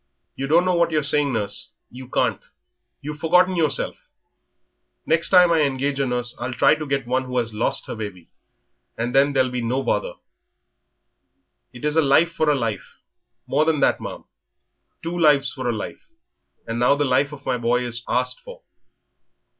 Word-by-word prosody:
"You 135 Hz, -, -4 dB
don't 170 Hz, +5 st, +4 dB
know 185 Hz, -, +2 dB
what 170 Hz, -1 st, +2 dB
you're 155 Hz, -2 st, 0 dB
saying, 145 Hz, 0 st, +2 dB
nurse; 100 Hz, -1 st, -4 dB, 0.2 s
you 130 Hz, +1 st, -11 dB
can't.... -, -, 0 dB, 0.6 s
You've 150 Hz, +1 st, -7 dB
forgotten 180 Hz, +4 st, +3 dB
yourself. 160 Hz, -4 st, -1 dB, 1.0 s
Next 160 Hz, +1 st, +1 dB
time 180 Hz, -2 st, +6 dB
I 165 Hz, -2 st, +3 dB
engage 140 Hz, 0 st, -1 dB
a 135 Hz, -, +1 dB
nurse 125 Hz, -1 st, -2 dB
I'll 120 Hz, +1 st, -4 dB
try 135 Hz, +4 st, +5 dB
to 155 Hz, 0 st, -4 dB
get 135 Hz, -2 st, -1 dB
one 130 Hz, +2 st, -1 dB
who 125 Hz, 0 st, -4 dB
has 115 Hz, -2 st, -1 dB
lost 105 Hz, -, +1 dB
her -, -, -6 dB
baby, 100 Hz, -6 st, -8 dB, 0.7 s
and 120 Hz, +2 st, -2 dB
then 140 Hz, +1 st, +4 dB
there'll 130 Hz, -2 st, +2 dB
be 125 Hz, -1 st, -3 dB
no 125 Hz, +4 st, -1 dB
bother." -, -, -1 dB, 1.6 s
"It -, -, -8 dB
is 150 Hz, 0 st, 0 dB
a 160 Hz, -, +5 dB
life 155 Hz, +4 st, +3 dB
for 155 Hz, -2 st, +1 dB
a 150 Hz, -, +3 dB
life 115 Hz, -5 st, -4 dB, 0.5 s
more 145 Hz, +3 st, +1 dB
than 155 Hz, -2 st, +1 dB
that, -, -, +2 dB
ma'am -, -, -7 dB, 0.8 s
two 170 Hz, +1 st, -3 dB
lives 145 Hz, -4 st, +3 dB
for 130 Hz, -3 st, -3 dB
a -, -, +2 dB
life; 110 Hz, -2 st, -6 dB, 0.6 s
and 115 Hz, +1 st, -4 dB
now 125 Hz, +3 st, +4 dB
the 145 Hz, 0 st, 0 dB
life 135 Hz, +2 st, +1 dB
of 145 Hz, -1 st, -11 dB
my 125 Hz, -2 st, -1 dB
boy 120 Hz, +1 st, +1 dB
is 120 Hz, 0 st, -2 dB
asked -, -, -1 dB
for." -, -, -13 dB
140 Hz, 185 wpm, -22 LUFS, 125-155 Hz, 1.6 s, time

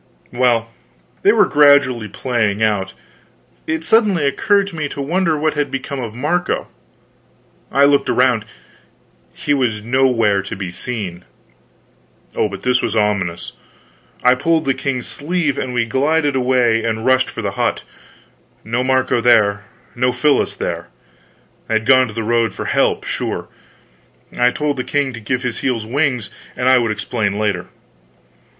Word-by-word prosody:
Well, 120 Hz, -2 st, +3 dB
while 115 Hz, -, -21 dB, 0.5 s
they -, -, +5 dB
were -, -, +4 dB
gradually 145 Hz, -6 st, +4 dB
playing 110 Hz, -1 st, -1 dB
out, 100 Hz, -3 st, 0 dB, 0.7 s
it 160 Hz, 0 st, -2 dB
suddenly 205 Hz, -9 st, +3 dB
occurred 200 Hz, +8 st, +2 dB
to 180 Hz, -, -11 dB
me 155 Hz, -2 st, -3 dB
to -, -, -8 dB
wonder 165 Hz, +3 st, 0 dB
what 155 Hz, +1 st, 0 dB
had 145 Hz, -1 st, -1 dB
become 135 Hz, +1 st, -4 dB
of 115 Hz, -3 st, -6 dB
Marco. 170 Hz, +8 st, -1 dB, 1.0 s
I 140 Hz, -, +3 dB
looked 140 Hz, -1 st, +2 dB
around; 125 Hz, -4 st, +2 dB, 0.9 s
he 145 Hz, -, -2 dB
was 120 Hz, -6 st, 0 dB
nowhere 115 Hz, -5 st, +2 dB
to 95 Hz, -, -7 dB
be 95 Hz, -2 st, -5 dB
seen. 95 Hz, -4 st, -6 dB, 1.1 s
Oh, 105 Hz, -, +1 dB
but 100 Hz, -1 st, -8 dB
this 125 Hz, 0 st, +2 dB
was 115 Hz, -, -2 dB
ominous! 100 Hz, -5 st, -1 dB, 0.7 s
I 125 Hz, -, +6 dB
pulled 160 Hz, +5 st, 0 dB
the 135 Hz, -, +2 dB
king's 130 Hz, -2 st, -3 dB
sleeve, 150 Hz, -2 st, -2 dB
and 130 Hz, -, -3 dB
we 120 Hz, -1 st, 0 dB
glided 145 Hz, +4 st, +1 dB
away 125 Hz, -3 st, +2 dB
and 110 Hz, 0 st, -2 dB
rushed 130 Hz, 0 st, +3 dB
for -, -, -6 dB
the -, -, -1 dB
hut. -, -, -1 dB, 0.8 s
No 120 Hz, +3 st, -1 dB
Marco 130 Hz, -2 st, +1 dB
there, 105 Hz, -4 st, +3 dB, 0.3 s
no 125 Hz, +1 st, +1 dB
Phyllis 140 Hz, +4 st, +1 dB
there! -, -, -4 dB, 0.8 s
They 110 Hz, -, -1 dB
had 110 Hz, 0 st, 0 dB
gone 130 Hz, 0 st, +5 dB
to 110 Hz, -, -9 dB
the 115 Hz, -, -2 dB
road 115 Hz, 0 st, +1 dB
for -, -, -5 dB
help, -, -, +1 dB
sure. -, -, -4 dB, 0.9 s
I 125 Hz, 0 st, +3 dB
told 145 Hz, +2 st, -2 dB
the 125 Hz, -, -2 dB
king 145 Hz, -2 st, -1 dB
to 115 Hz, -, -7 dB
give 125 Hz, +4 st, -2 dB
his 120 Hz, -2 st, -3 dB
heels 120 Hz, -5 st, -1 dB
wings, 125 Hz, -2 st, -1 dB, 0.2 s
and 125 Hz, -, -1 dB
I 130 Hz, -1 st, +6 dB
would 115 Hz, -2 st, 0 dB
explain 105 Hz, -2 st, -2 dB
later. 105 Hz, -4 st, -1 dB
125 Hz, 160 wpm, -18 LUFS, 110-140 Hz, 1.1 s, I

